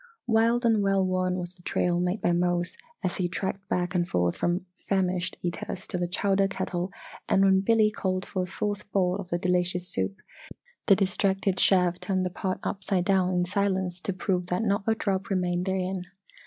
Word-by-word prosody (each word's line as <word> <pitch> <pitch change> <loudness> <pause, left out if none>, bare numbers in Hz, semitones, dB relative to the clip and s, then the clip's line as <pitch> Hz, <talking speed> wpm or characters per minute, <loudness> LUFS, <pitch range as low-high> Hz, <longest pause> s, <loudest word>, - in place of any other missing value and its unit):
Wide 230 +1 +3
and 225 -2 +4
well 195 -1 +2
worn 185 0 0
was 175 0 -5
the 180 - -17
trail 175 0 0
made 180 +4 -1
by - - +2
Mose 175 0 +1 0.3
as 185 - -1
he 180 -2 0
tracked 195 +2 -4
back 180 +1 0
and 175 -1 0
forth 90 -1 +1
from 175 +2 -1 0.2
famished 185 -2 0
eaters 180 +1 -4
to 180 - -2
the 175 - 0
chowder 195 +2 +2
kettle 180 -1 -3 0.4
and 195 0 +4
when 190 0 +5
Billy 215 +1 +4
called 185 -2 -2
for 185 - -2
a 180 - -2
fourth 205 +2 -4
bowl 185 -2 +2
of 195 -3 -7
the 175 - 0
delicious 180 0 0
soup, 95 - -1 0.7
the 195 - +7
distracted 195 0 +1
chef 180 -2 +4
turned 190 -2 -1
the 180 - -2
pot 185 +1 -3
upside 195 -2 -1
down 190 -2 +3
in 180 -1 +1
silence 190 -2 -1
to 195 - -2
prove 185 -1 -1
that 180 +4 0
not 200 -1 +1
a 225 - +3
drop 195 -3 -1
remained 180 -1 0
therein. 190 -1 -1
185 Hz, 195 wpm, -27 LUFS, 180-195 Hz, 0.7 s, the